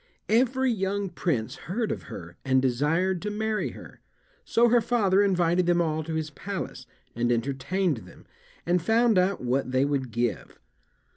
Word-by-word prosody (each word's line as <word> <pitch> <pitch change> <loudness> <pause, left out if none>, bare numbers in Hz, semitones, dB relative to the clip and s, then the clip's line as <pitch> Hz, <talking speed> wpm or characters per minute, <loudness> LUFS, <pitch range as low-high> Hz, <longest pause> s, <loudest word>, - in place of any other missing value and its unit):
Every 255 +3 +3
young 200 -1 -1
prince 155 -10 -2
heard 220 +4 -1
of - - -5
her 85 -1 -9
and 130 -1 +3
desired 155 +8 +1
to 210 - -3
marry 215 +1 -1
her; - - -13 0.4
so 235 +1 +3
her 240 0 +4
father 205 -4 +2
invited 180 -3 +2
them 175 0 +3
all 160 -2 0
to 160 0 -4
his 155 -1 -3
palace, 160 -5 -6 0.3
and 120 +1 +1
entertained 140 +7 0
them, 110 - -14 0.4
and 175 +1 +2
found 225 +1 +3
out 185 +1 +1
what 125 +1 -1
they 130 +1 +2
would 140 -3 -1
give. 120 +1 -2
175 Hz, 160 wpm, -26 LUFS, 135-205 Hz, 0.4 s, her